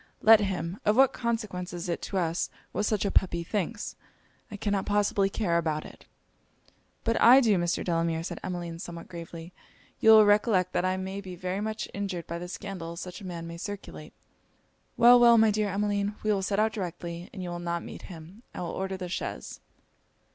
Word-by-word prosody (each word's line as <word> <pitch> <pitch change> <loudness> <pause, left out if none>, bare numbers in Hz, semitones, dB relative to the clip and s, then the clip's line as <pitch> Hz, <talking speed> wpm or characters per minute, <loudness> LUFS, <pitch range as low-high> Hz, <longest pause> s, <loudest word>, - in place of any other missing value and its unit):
'Let 220 0 +8
him 190 -2 -3
Of 210 - +3
what 270 0 +6
consequence 215 -7 -3
is 175 0 -5
it 170 - -2
to 195 - -4
us 170 -1 0 0.2
what 210 - -1
such 210 -2 0
a 200 - 0
puppy 170 -3 +1
thinks? 210 +4 -3 0.5
I 205 - -7
cannot 200 -1 -1
possibly 205 -1 +2
care 180 -5 0
about 155 -2 -2
it.' - - -13 1.0
'But 230 0 0
I 250 +3 +9
do, 215 -8 +3
Mr. 175 0 0
Delamere,' 165 -1 0
said - - -5
Emmeline, 175 -2 -5
somewhat 170 -2 -8
gravely. 170 0 -9 0.5
'You 220 - +4
will 220 -1 +9
recollect 205 -3 +3
that - - +1
I 185 0 +1
may 190 +1 -4
be 185 -2 -8
very 185 +3 -3
much 215 0 -3
injured 195 -4 -4
by 170 0 -5
the 175 - -6
scandal 180 -3 -6
such 180 +4 -7
a 190 - -7
man 170 -2 -6
may 170 0 -7
circulate.' 170 - -8 0.8
'Well, 240 +1 +8
well, 235 -1 +7
my 220 -1 +5
dear 210 0 0
Emmeline 205 +1 -1
we 215 0 +2
will 195 - 0
set 195 +1 -1
out 220 +1 +2
directly, 175 -3 -5
and 190 -4 -7
you 180 - -4
will 175 - -4
not 170 0 -3
meet - - -9
him. 175 +4 -11
I - - -5
will 175 - -3
order 190 0 -3
the 185 -1 -5
chaise.' 60 - -5
190 Hz, 200 wpm, -28 LUFS, 170-210 Hz, 1.0 s, I